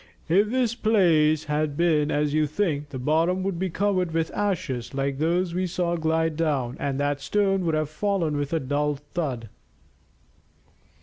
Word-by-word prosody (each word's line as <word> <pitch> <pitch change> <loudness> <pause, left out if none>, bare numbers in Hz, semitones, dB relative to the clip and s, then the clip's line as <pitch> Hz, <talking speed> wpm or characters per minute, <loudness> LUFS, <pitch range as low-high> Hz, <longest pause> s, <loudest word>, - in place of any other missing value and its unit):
"If 200 +6 +3
this 245 -2 +1
place 170 -10 +3
had 150 -1 -1
been 155 -4 +2
as 150 -1 0
you 155 0 +2
think, 150 -3 -1
the 135 - -6
bottom 165 +8 +1
would 190 -3 -2
be 190 0 -1
covered 185 -2 0
with 165 -1 0
ashes 180 - -2
like 135 0 -1
those 170 +2 +1
we 185 +1 0
saw 175 -1 -1
glide 160 -1 0
down, 140 -6 -1
and 140 -1 -2
that 145 0 0
stone 195 +4 +1
would 160 -2 +1
have 155 -1 0
fallen 165 -1 -1
with 145 -1 -2
a 165 - +1
dull 145 +2 0
thud." 140 -5 -4
160 Hz, 170 wpm, -25 LUFS, 145-185 Hz, -, If